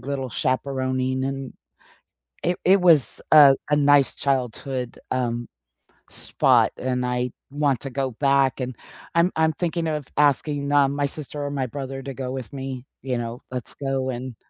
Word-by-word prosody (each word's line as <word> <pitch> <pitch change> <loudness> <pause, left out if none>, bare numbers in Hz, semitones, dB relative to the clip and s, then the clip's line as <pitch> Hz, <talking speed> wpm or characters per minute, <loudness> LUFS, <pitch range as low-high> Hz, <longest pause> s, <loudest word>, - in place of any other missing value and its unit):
little 135 0 -4
chaperoning, 130 0 -1
and 135 -1 -4 0.9
it 175 +1 0
it 190 +2 +5
was 165 -7 +4
a 140 -3 +9
a - - +5
nice 145 -1 +4
childhood, 130 -1 -2
um, 120 -1 -1 0.6
spot - - +3
and 125 0 -1
I 125 0 -1 0.2
want 140 -5 +1
to 135 - -5
go 135 0 -1
back 135 +1 +2
and 125 0 -4 0.4
I'm 170 +2 +4
I'm 160 0 +2
thinking 170 0 -2
of 150 -3 -3
asking, 145 0 +2
um, 140 -1 +4
my 145 - +1
sister 145 0 -5
or 145 - -3
my 135 -3 -2
brother 135 +1 -6
to 135 0 -6
go 130 -1 -4
with 130 -3 -6
me, 135 -2 -6 0.2
you 130 -2 -1
know, 120 +1 -5
let's 125 -3 -5
go 135 -1 -2
and 125 -1 -5
135 Hz, 160 wpm, -24 LUFS, 130-145 Hz, 0.9 s, a